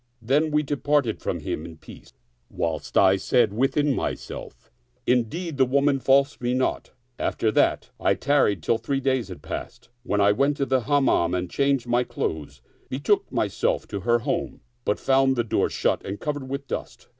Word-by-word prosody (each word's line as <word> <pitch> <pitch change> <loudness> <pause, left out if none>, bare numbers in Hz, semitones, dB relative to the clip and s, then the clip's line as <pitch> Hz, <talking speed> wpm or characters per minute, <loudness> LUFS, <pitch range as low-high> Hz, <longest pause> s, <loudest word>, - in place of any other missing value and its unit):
Then 140 +7 +1
we 150 0 +1
departed 145 -4 0
from - - -3
him 75 - -4
in 80 -1 -10
peace, - - -14 0.4
whilst 80 -2 -3
I 95 0 +5
said 110 +2 +2
within 135 +5 +1
myself, - - -6 0.2
" 125 0 -42
Indeed, 155 +7 -3
the 130 - +5
woman 140 +1 +2
falsed 135 +1 +2
me 125 +1 0
not." 130 - -1 0.3
After 110 - 0
that - - +1
I - - +2
tarried 130 - +2
till 115 - +1
three 135 +4 -1
days 130 -5 0
had 90 -3 -10
passed, - - -7
when 105 -4 -1
I 100 0 +5
went 140 +6 +1
to 140 - 0
the 130 -3 0
Hammam 135 - +2
and 90 -1 -3
changing 140 -3 0
my 120 +1 +3
clothes, 75 - -5 0.3
betook 145 +11 0
myself - - 0
to 100 - -4
her 120 +4 +2
home, 115 - -3 0.2
but 105 - 0
found 135 0 +3
the 120 - +1
door 115 - 0
shut - - 0
and 100 +1 -5
covered 145 -3 -4
with 140 +1 -4
dust. - - -6
130 Hz, 180 wpm, -24 LUFS, 105-140 Hz, 0.4 s, I